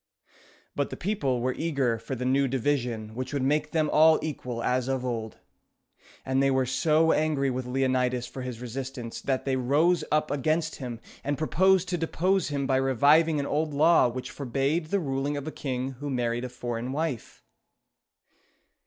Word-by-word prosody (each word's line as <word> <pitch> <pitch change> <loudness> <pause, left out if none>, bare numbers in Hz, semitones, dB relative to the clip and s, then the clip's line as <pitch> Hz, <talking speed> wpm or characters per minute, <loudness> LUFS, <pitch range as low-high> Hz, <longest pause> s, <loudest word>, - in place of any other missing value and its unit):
But 140 - -1
the - - -7
people 140 - -1
were 130 +1 0
eager 135 -8 0
for 115 +4 -5
the 125 +1 -4
new 135 +2 +2
division 125 -4 -1
which 130 +2 -5
would 140 -2 0
make 150 +2 +1
them 155 -1 +1
all 155 +1 +6
equal 125 -6 -4
as 125 0 0
of 130 -1 -1
old; 115 -3 -4 0.9
and 130 +1 +1
they 135 - +3
were 130 -1 +2
so 155 +5 +3
angry 150 -3 +1
with 125 0 -4
Leonidas 125 -1 0
for 130 - -8
his 125 -2 -6
resistance, 125 -1 -6
that 135 -1 -1
they 135 -1 +1
rose 145 +8 +2
up 155 0 +1
against 155 +3 0
him, 120 -4 -6 0.2
and 145 0 -1
proposed 190 +4 +3
to 175 -2 -1
depose 180 +3 +1
him 140 -2 -2
by 130 -1 +2
reviving 145 +5 +4
an 140 - -1
old 150 +1 -1
law 160 0 +5
which 125 +1 -5
forbade 140 +5 -1
the 200 +5 +1
ruling 140 -2 -2
of 140 - -5
a - - -3
king 130 -2 -3
who 140 +3 -6
married 120 -2 -1
a - - -5
foreign 120 0 -4
wife. 145 - -4
135 Hz, 180 wpm, -27 LUFS, 125-155 Hz, 0.9 s, all